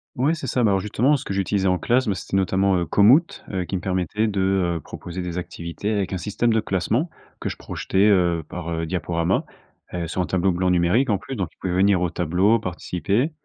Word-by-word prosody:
Ouais, 140 Hz, +6 st, +2 dB
c'est 150 Hz, -5 st, -5 dB
ça. 125 Hz, +1 st, +1 dB
Bah, 105 Hz, -, +4 dB
alors 95 Hz, -, +2 dB
justement, 120 Hz, +8 st, +2 dB
ce 135 Hz, -, -4 dB
que -, -, -4 dB
j'utilisais 95 Hz, 0 st, 0 dB
en 90 Hz, -, +3 dB
classe, 120 Hz, +5 st, +1 dB
bah, 100 Hz, -, +1 dB
c'était 95 Hz, +2 st, -3 dB
notamment, 95 Hz, 0 st, +2 dB
heu, 85 Hz, -, 0 dB
Komoot. 125 Hz, -, +4 dB
Heu, 95 Hz, -2 st, -2 dB
qui 95 Hz, -, -4 dB
me 90 Hz, -, -2 dB
permettait 95 Hz, +4 st, -1 dB
de, 95 Hz, -3 st, +1 dB
heu, -, -, -5 dB
proposer 90 Hz, +1 st, -7 dB
des 90 Hz, -1 st, -4 dB
activités 85 Hz, +3 st, -4 dB
avec 100 Hz, -3 st, -1 dB
un 95 Hz, -, -1 dB
système 105 Hz, +6 st, 0 dB
de 110 Hz, -, +3 dB
classement. 110 Hz, -, 0 dB, 0.3 s
Que -, -, -3 dB
je -, -, -6 dB
projetais, 100 Hz, +2 st, 0 dB
heu, 85 Hz, -5 st, +3 dB
par, 85 Hz, -2 st, -6 dB
heu, 80 Hz, 0 st, -2 dB
diaporama, 85 Hz, 0 st, 0 dB, 0.5 s
et 85 Hz, -2 st, -3 dB
sur 90 Hz, -, -2 dB
un -, -, 0 dB
tableau 95 Hz, +1 st, +1 dB
blanc 90 Hz, +1 st, +1 dB
numérique 90 Hz, +10 st, +2 dB
en 100 Hz, -, +1 dB
plus. 135 Hz, -, -7 dB
Donc, 95 Hz, -6 st, -2 dB
ils -, -, -37 dB
pouvaient 90 Hz, -2 st, -2 dB
venir 95 Hz, -1 st, +3 dB
au 90 Hz, -, +1 dB
tableau, 90 Hz, +7 st, +2 dB
participer. 95 Hz, -, -1 dB
95 Hz, 230 wpm, -23 LUFS, 90-105 Hz, 0.5 s, Bah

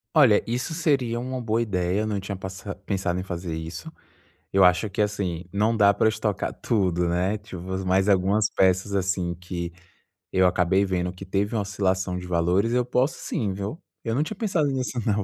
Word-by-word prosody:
Olha, 130 Hz, -9 st, +6 dB
isso 125 Hz, +7 st, -2 dB
seria 135 Hz, -8 st, +1 dB
uma 130 Hz, +1 st, -4 dB
boa 115 Hz, -1 st, 0 dB
ideia, 95 Hz, -3 st, 0 dB
eu 110 Hz, -, -1 dB
não 105 Hz, -2 st, -1 dB
tinha 95 Hz, +1 st, -5 dB
passa 95 Hz, +1 st, -6 dB
pensado 95 Hz, -2 st, -1 dB
em 90 Hz, -, -3 dB
fazer 85 Hz, -3 st, -4 dB
isso. 80 Hz, +1 st, -6 dB, 0.6 s
Eu 95 Hz, -1 st, +5 dB
acho 90 Hz, +4 st, +4 dB
que 100 Hz, +2 st, 0 dB
assim, 100 Hz, -5 st, -2 dB
não 110 Hz, +3 st, +2 dB
dá 100 Hz, -1 st, +6 dB
para 110 Hz, -, +1 dB
eu -, -, +7 dB
estocar 110 Hz, -2 st, -1 dB
tudo, 90 Hz, -6 st, +1 dB
né? 90 Hz, +4 st, +1 dB
Tipo, 100 Hz, -4 st, -9 dB, 0.2 s
mais 95 Hz, +2 st, +2 dB
algumas 100 Hz, +2 st, +3 dB
peças, 95 Hz, +1 st, +2 dB
assim, 95 Hz, -2 st, 0 dB
que 85 Hz, 0 st, -5 dB, 0.6 s
eu 95 Hz, 0 st, +5 dB
acabei 90 Hz, +2 st, +2 dB
vendo 90 Hz, -1 st, -1 dB
que 95 Hz, +1 st, -10 dB
teve 100 Hz, +3 st, -1 dB
uma 110 Hz, -, +1 dB
oscilação 95 Hz, -2 st, -1 dB
de 90 Hz, -, -6 dB
valores, 90 Hz, +6 st, +1 dB
eu 125 Hz, -, +3 dB
posso 125 Hz, +4 st, 0 dB
sim, 105 Hz, -, -2 dB
viu? 100 Hz, -, -5 dB, 0.2 s
Eu 115 Hz, 0 st, -1 dB
não 145 Hz, -, +2 dB
tinha 215 Hz, -, -5 dB
pensado 190 Hz, -10 st, +1 dB
nisso 130 Hz, -1 st, -2 dB
não 105 Hz, -2 st, +1 dB
100 Hz, 195 wpm, -25 LUFS, 90-110 Hz, 0.6 s, eu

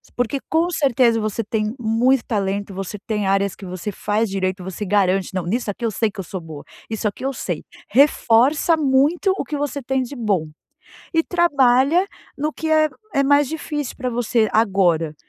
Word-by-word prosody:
Porque 245 Hz, +3 st, -1 dB
com 330 Hz, +2 st, +2 dB
certeza 250 Hz, -7 st, +3 dB
você 215 Hz, +1 st, -2 dB
tem 215 Hz, 0 st, -2 dB
muito 235 Hz, +3 st, +2 dB
talento. 200 Hz, -2 st, -2 dB
Você 195 Hz, +2 st, -5 dB
tem 210 Hz, -3 st, -1 dB
áreas 195 Hz, -1 st, +1 dB
que 200 Hz, -, -11 dB
você 185 Hz, +2 st, -5 dB
faz 210 Hz, +2 st, -1 dB
direito, 185 Hz, -1 st, -2 dB
você 190 Hz, +3 st, -5 dB
garante: 195 Hz, -1 st, +1 dB
"Não 185 Hz, -3 st, -2 dB
nisso 220 Hz, +2 st, -1 dB
aqui 235 Hz, +4 st, -5 dB
eu 225 Hz, -, 0 dB
sei 215 Hz, +1 st, 0 dB
que 200 Hz, -, -12 dB
eu -, -, -2 dB
sou 185 Hz, -, -3 dB
boa 155 Hz, -3 st, -9 dB, 0.3 s
isso 220 Hz, -1 st, -2 dB
aqui 210 Hz, +5 st, -5 dB
eu 270 Hz, -, 0 dB
sei". 175 Hz, -9 st, -4 dB, 0.3 s
Reforça 275 Hz, +4 st, +4 dB
muito 300 Hz, +7 st, +2 dB
o -, -, -2 dB
que 300 Hz, -, -4 dB
você 285 Hz, -1 st, -3 dB
tem 265 Hz, +1 st, -1 dB
de 255 Hz, +3 st, -8 dB
bom, 195 Hz, -9 st, 0 dB, 0.7 s
e 325 Hz, -, +4 dB
trabalha 300 Hz, 0 st, +3 dB, 0.3 s
no 300 Hz, +2 st, 0 dB
que 320 Hz, +1 st, -4 dB
é 310 Hz, 0 st, +4 dB, 0.3 s
é 275 Hz, -, +3 dB
mais 285 Hz, 0 st, +4 dB
difícil 295 Hz, -3 st, -4 dB
pra 255 Hz, -1 st, -3 dB
você 230 Hz, -2 st, +1 dB
agora, 180 Hz, -7 st, +2 dB
230 Hz, 190 wpm, -21 LUFS, 195-275 Hz, 0.7 s, Reforça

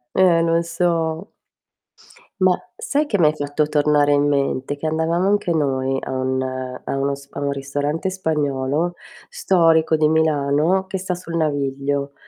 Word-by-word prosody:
Eh, 180 Hz, -3 st, +4 dB
lo 165 Hz, 0 st, +2 dB
so. 170 Hz, +1 st, -1 dB, 1.1 s
Ma 185 Hz, -1 st, +5 dB, 0.2 s
sai 295 Hz, +1 st, -1 dB
che 205 Hz, -, 0 dB
m'hai 155 Hz, -3 st, +4 dB
fatto 145 Hz, 0 st, -1 dB
tornare 150 Hz, -1 st, +2 dB
in 145 Hz, 0 st, +3 dB
mente? 140 Hz, 0 st, -1 dB
Che 160 Hz, -, -7 dB
andavamo 165 Hz, +4 st, 0 dB
anche 205 Hz, -3 st, +1 dB
noi 135 Hz, -3 st, 0 dB
a -, -, -7 dB
un 130 Hz, 0 st, -1 dB
a 130 Hz, 0 st, -5 dB
uno 140 Hz, 0 st, 0 dB
s 140 Hz, 0 st, -15 dB
a -, -, -7 dB
un 140 Hz, 0 st, -1 dB
ristorante 145 Hz, +6 st, -2 dB
spagnolo 150 Hz, -2 st, -1 dB, 0.3 s
storico 165 Hz, -, +3 dB
di 155 Hz, -1 st, +3 dB
Milano, 160 Hz, +3 st, +2 dB
che 190 Hz, 0 st, -4 dB
sta 180 Hz, -1 st, -3 dB
sul 170 Hz, -1 st, -7 dB
naviglio 140 Hz, -2 st, -1 dB
155 Hz, 150 wpm, -21 LUFS, 140-170 Hz, 1.1 s, Ma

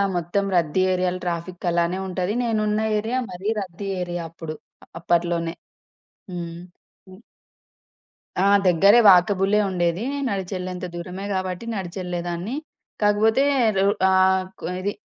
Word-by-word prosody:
మొత్తం 175 Hz, +4 st, -1 dB
రద్దీ 170 Hz, +2 st, +2 dB
ఏరియాల 180 Hz, 0 st, 0 dB
ట్రాఫిక్ 175 Hz, +1 st, -4 dB
అలానే 170 Hz, +1 st, +1 dB
ఉంటది. 185 Hz, +2 st, -2 dB
నేనున్న 215 Hz, -2 st, 0 dB, 0.2 s
ఏరియా 225 Hz, +4 st, -2 dB
మరీ 185 Hz, +3 st, -4 dB
రద్దీ 195 Hz, +1 st, -7 dB
ఏరియా 175 Hz, -1 st, -3 dB
అప్పుడు. 160 Hz, -1 st, -7 dB, 0.4 s
అప్పట్లోనే 170 Hz, 0 st, 0 dB, 0.8 s
హ్మ్. 170 Hz, -1 st, -5 dB, 0.5 s
హ్మ్. 185 Hz, +2 st, -14 dB, 1.2 s
ఆ! -, -, +3 dB, 0.2 s
దెగ్గరే 195 Hz, +6 st, +6 dB
వాకబులే 195 Hz, +2 st, +4 dB
ఉండేది. 175 Hz, +3 st, 0 dB, 0.2 s
నడిచెళ్ళేంత 185 Hz, -2 st, -4 dB
దూరమే 180 Hz, +3 st, -6 dB
గాబట్టి 185 Hz, +2 st, -3 dB
నడిచెళ్ళేదాన్ని. 180 Hz, +2 st, -4 dB, 0.5 s
కాకపోతే 215 Hz, +5 st, +3 dB, 0.3 s
రొ 195 Hz, -, +3 dB, 0.2 s
ఆహ్, 190 Hz, 0 st, +4 dB, 0.2 s
కు -, -, -7 dB
ఇది 200 Hz, +2 st, -1 dB
185 Hz, 110 wpm, -23 LUFS, 175-195 Hz, 1.2 s, దెగ్గరే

